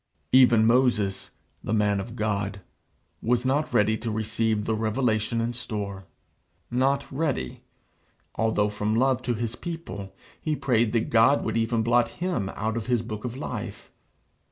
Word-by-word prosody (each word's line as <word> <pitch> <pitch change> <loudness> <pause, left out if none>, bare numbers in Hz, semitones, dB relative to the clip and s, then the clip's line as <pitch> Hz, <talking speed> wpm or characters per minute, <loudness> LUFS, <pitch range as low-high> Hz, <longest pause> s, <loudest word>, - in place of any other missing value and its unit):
Even 120 -4 +6
Moses, 115 -5 +2 0.3
the 110 - 0
man 105 -1 +2
of 115 +4 -6
God, 100 -3 -2 0.6
was 120 +2 +1
not 145 +4 +1
ready 105 +1 +3
to 115 - -3
receive 110 0 0
the 110 - 0
revelation 110 0 0
in 115 +1 -1
store; 105 -5 -4 0.7
not 135 +3 +1
ready, 135 - -2 0.7
although 110 -2 +1
from 105 +1 -1
love 130 +1 +2
to 125 -1 -1
his 115 +1 -3
people 105 - -7 0.3
he 155 -1 -1
prayed 120 -5 +1
that 115 -2 0
God 115 +5 +5
would - - -1
even 115 0 +1
blot 120 +1 +3
him 175 - -2
out 110 +2 -2
of 110 - -4
his 120 -2 +1
book 110 -1 -6
of 125 +1 -4
life. - - -6
115 Hz, 155 wpm, -26 LUFS, 105-125 Hz, 0.7 s, Even